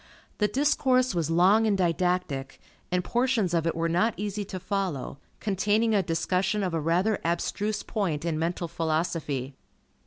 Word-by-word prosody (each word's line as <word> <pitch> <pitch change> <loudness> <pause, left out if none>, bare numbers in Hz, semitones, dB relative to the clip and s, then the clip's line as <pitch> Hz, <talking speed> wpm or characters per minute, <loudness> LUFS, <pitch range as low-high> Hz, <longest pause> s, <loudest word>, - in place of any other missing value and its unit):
The 210 - +3
discourse 255 0 +2
was 165 -3 -1
long 190 +7 +4
and 205 -2 +2
didactic, 175 -6 -1 0.3
and 180 0 +1
portions 240 -7 +1
of 165 -1 +1
it 165 - 0
were 165 0 0
not 180 +7 +1
easy 205 0 -3
to 190 -1 -6
follow, 185 -8 -3 0.2
containing 210 +2 +1
a 200 - +4
discussion 185 +4 0
of 180 -3 -2
a 165 - 0
rather 180 +7 +1
abstruse 205 +5 -1
point 170 -8 -2
in 160 -2 -1
mental 170 +1 -1
philosophy. 160 -5 -2
180 Hz, 155 wpm, -27 LUFS, 165-210 Hz, 0.3 s, long